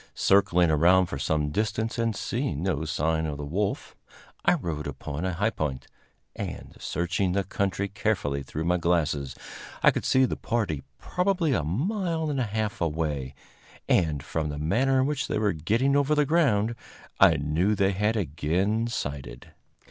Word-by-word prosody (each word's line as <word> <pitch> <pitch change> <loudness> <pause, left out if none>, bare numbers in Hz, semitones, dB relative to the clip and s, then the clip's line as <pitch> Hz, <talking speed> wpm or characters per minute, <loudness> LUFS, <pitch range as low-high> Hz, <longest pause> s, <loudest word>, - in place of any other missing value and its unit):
Circling 90 -4 +4
around 90 +5 +5
for 70 -5 -6
some 75 +1 0
distance 110 +5 -1
and 115 -2 0
seeing 110 - -2
no 80 -5 -1
sign 80 +1 0
of 75 -2 -4
the 75 - -5
wolf, 100 +7 -2 0.5
I - - +4
rode 75 -4 -4
upon 70 +4 -5
a 95 - -1
high 100 +6 +1
point, 75 -9 -3 0.5
and, - - -6
searching 90 +2 -1
the 100 +1 +1
country 100 0 -1
carefully 100 -9 -1
through 75 +3 -5
my 90 +1 +2
glasses, 75 -6 0 0.5
I - - +7
could - - -3
see 130 0 +4
the - - -2
party 105 - -2 0.2
probably 180 -5 0
a 85 - +1
mile 160 - -1
and 140 - -1
a 125 - +1
half 110 0 -3
away; 75 -5 -2 0.5
and, 75 -5 +2
from 80 0 -2
the 75 - -4
manner 130 - +2
in - - +2
which 140 -1 -1
they - - -1
were 105 -1 +1
getting 115 - +1
over 145 +1 +3
the 150 -1 +3
ground, 125 -9 +2 0.5
I 80 - +7
knew 80 +9 +1
they 95 0 +2
had 105 +3 0
again 95 +6 0
sighted. 70 - -5
95 Hz, 170 wpm, -27 LUFS, 75-115 Hz, 0.5 s, I